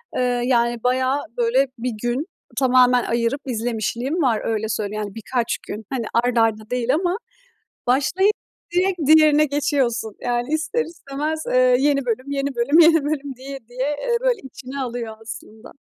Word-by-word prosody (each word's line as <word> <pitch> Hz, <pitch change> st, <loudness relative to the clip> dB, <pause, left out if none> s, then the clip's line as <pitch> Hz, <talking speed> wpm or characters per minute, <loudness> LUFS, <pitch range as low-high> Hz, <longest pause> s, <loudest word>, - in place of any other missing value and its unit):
Eee, -, -, 0 dB, 0.2 s
yani 235 Hz, -2 st, +1 dB
bayağı, 260 Hz, +2 st, +2 dB, 0.2 s
böyle, 245 Hz, +3 st, +3 dB
bir 250 Hz, +2 st, -2 dB
gün 245 Hz, +5 st, -1 dB, 0.3 s
tamamen 250 Hz, -2 st, +4 dB
ayırıp 235 Hz, +4 st, 0 dB
izlemişliğim 240 Hz, -, -2 dB
var 235 Hz, -7 st, +2 dB
öyle 220 Hz, -1 st, -1 dB
söyleyeyim, 215 Hz, 0 st, -2 dB
yani, 200 Hz, -, -10 dB
birkaç 230 Hz, +1 st, -2 dB
gün. 215 Hz, +1 st, -6 dB
Hani, 250 Hz, -4 st, -2 dB
art 240 Hz, +1 st, +1 dB
arda 220 Hz, -1 st, +1 dB
değil 250 Hz, 0 st, 0 dB
ama 350 Hz, +4 st, 0 dB, 0.7 s
başlayıp 285 Hz, +11 st, +3 dB, 0.4 s
direkt 365 Hz, +1 st, +2 dB
diğerine 305 Hz, 0 st, +6 dB
geçiyorsun. 270 Hz, -6 st, 0 dB
Yani, 240 Hz, 0 st, -1 dB
ister 325 Hz, +10 st, 0 dB
istemez, 310 Hz, -1 st, -4 dB
eee, 255 Hz, 0 st, +5 dB
yeni 275 Hz, -1 st, +2 dB
bölüm, 255 Hz, +4 st, -2 dB
yeni 280 Hz, 0 st, -2 dB
bölüm, 275 Hz, +7 st, +3 dB
yeni 325 Hz, -2 st, +6 dB
bölüm 285 Hz, -2 st, -3 dB
diye 270 Hz, +2 st, -7 dB
diye, 255 Hz, +3 st, -2 dB
eee, 480 Hz, -1 st, +1 dB
böyle -, -, +1 dB
içine 265 Hz, +1 st, -8 dB
alıyor 235 Hz, -3 st, -4 dB
aslında. 220 Hz, 0 st, -10 dB
255 Hz, 155 wpm, -22 LUFS, 235-290 Hz, 0.7 s, diğerine